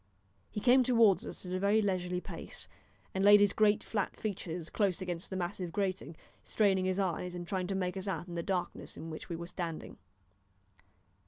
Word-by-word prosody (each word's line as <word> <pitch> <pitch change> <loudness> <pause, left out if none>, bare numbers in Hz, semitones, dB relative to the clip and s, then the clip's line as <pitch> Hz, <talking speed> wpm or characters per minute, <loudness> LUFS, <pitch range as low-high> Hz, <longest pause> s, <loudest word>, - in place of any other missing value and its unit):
He - - -4
came 250 +4 +6
towards 230 -6 +4
us - - -7
at 180 - -4
a 185 - 0
very 200 +3 +3
leisurely 180 -3 0
pace, - - -7 0.5
and 190 - 0
laid 205 +1 +9
his 205 -1 +4
great 210 -1 +3
flat 205 -3 -2
features 175 -5 -4
close 200 -5 +1
against 175 -2 -4
the 190 - -4
massive 180 -1 -3
grating, 185 -4 -2 0.3
straining 195 -3 +2
his 185 +1 0
eyes, 180 -1 -1
and 175 -1 -6
trying 185 0 -1
to 195 - -2
make 180 -1 -1
us 190 +1 -5
out 175 -2 -3
in 175 - -7
the 170 - -2
darkness 180 0 -3
in 165 - -7
which 155 - -8
we 170 - -2
were 170 +1 -5
standing. 170 -2 -5
185 Hz, 195 wpm, -32 LUFS, 175-200 Hz, 0.5 s, laid